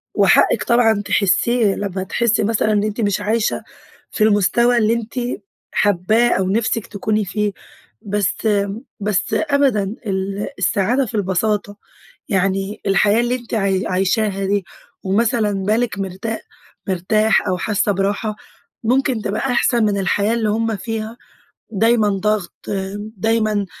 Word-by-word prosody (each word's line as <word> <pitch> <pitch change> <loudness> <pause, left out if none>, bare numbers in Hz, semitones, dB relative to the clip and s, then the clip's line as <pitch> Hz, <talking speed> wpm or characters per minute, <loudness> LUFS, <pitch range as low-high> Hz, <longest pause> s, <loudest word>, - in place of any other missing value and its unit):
وحقِك - - +4
طبعًا 225 -3 +3
تحسيه 205 +2 +2
لما 190 -2 -3
تحسي 230 +3 +1
مثلًا 215 0 +1
إن 205 -1 +2
إنتِ 215 +2 -2
مش 205 -1 0
عايشة 220 +2 0 0.5
في 215 - 0
المستوى 220 +4 +3
اللي 220 0 +3
أنتِ 230 -1 -4 0.6
حابّاه 210 +4 +2
أو 185 0 0
نِفسك 220 +1 0
تكوني 210 0 -1
فيه، 210 +2 -1 0.5
بس 205 0 -1 0.5
بس 205 -2 -1
أبدًا، 280 -8 +2 0.2
ال 195 +1 -2
السعادة 235 +6 +1
في 225 -1 -7
البساطة، 205 +1 -1 0.5
يعني 195 0 -1
الحياة 205 +3 +3
اللي 240 +1 0
أنتِ 240 -2 -9
عاي 195 -2 0
عايشاها 195 +2 0
دي 200 -2 0 0.4
ومثلًا 215 +2 +1
بالِك 220 0 0
مرتا 195 +4 -4 0.5
مرتاح 205 +4 +2
أو 185 -1 0
حاسة 210 +1 0
براحة، 200 +2 -1 0.5
ممكن 250 -1 +1
تبقى 200 +1 -2
أحسن 245 -2 +2
من 205 -1 +1
الحياة 200 +3 +1
اللي 225 -2 0
هم 225 +1 0
فيها، 220 +2 -5 0.5
دايمًا 225 +1 +3
ضغط، 200 -1 -1 0.6
دايمًا 215 -1 +1
210 Hz, 130 wpm, -19 LUFS, 195-225 Hz, 0.6 s, وحقِك